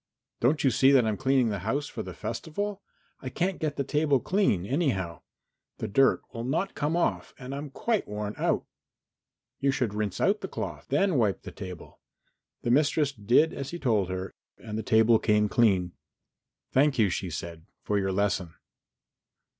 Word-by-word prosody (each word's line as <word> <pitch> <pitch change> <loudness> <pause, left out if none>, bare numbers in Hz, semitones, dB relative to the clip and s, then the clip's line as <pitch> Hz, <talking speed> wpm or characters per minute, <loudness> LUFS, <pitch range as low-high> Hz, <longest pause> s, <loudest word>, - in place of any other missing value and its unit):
"Don't 145 +6 +2
you 135 - +4
see 130 +4 +4
that 130 -4 +5
I'm 110 -1 0
cleaning 130 +1 +2
the 100 -2 -2
house 135 +10 -1
for - - -6
the - - -8
festival? 195 - -4 0.4
I 130 - -6
can't 180 +7 -1
get 155 -2 -2
the 140 - -1
table 145 -1 +2
clean, 180 - +1
anyhow. 100 - -1 0.6
The - - -4
dirt 135 +7 +3
will 115 -1 -5
not 160 +10 -1
come 150 +2 -1
off 175 - -1
and 130 0 -7
I'm 145 +1 -5
quite 220 - -1
worn 105 0 -4
out." - - 0 0.9
"You 140 - +1
should 130 -6 0
rinse 105 -3 -2
out 205 +2 +2
the 190 - -4
cloth, - - -6
then 195 -8 +2
wipe 105 -4 +1
the - - -8
table." 90 -4 -9 0.6
The 120 - +1
mistress 145 +1 +3
did 125 +6 +3
as 140 -1 -5
he 175 - -5
told 110 - +1
her 95 +1 -4 0.3
and 105 -2 -7
the 110 - -1
table 110 0 +4
came 105 -1 +3
clean. 95 -6 +2 0.8
"Thank 140 +1 +3
you," 105 -5 +3
she 90 +1 -3
said, 85 0 -7 0.2
"for 105 -1 0
your 95 -1 0
lesson." 95 -3 -1
120 Hz, 180 wpm, -28 LUFS, 105-145 Hz, 0.9 s, that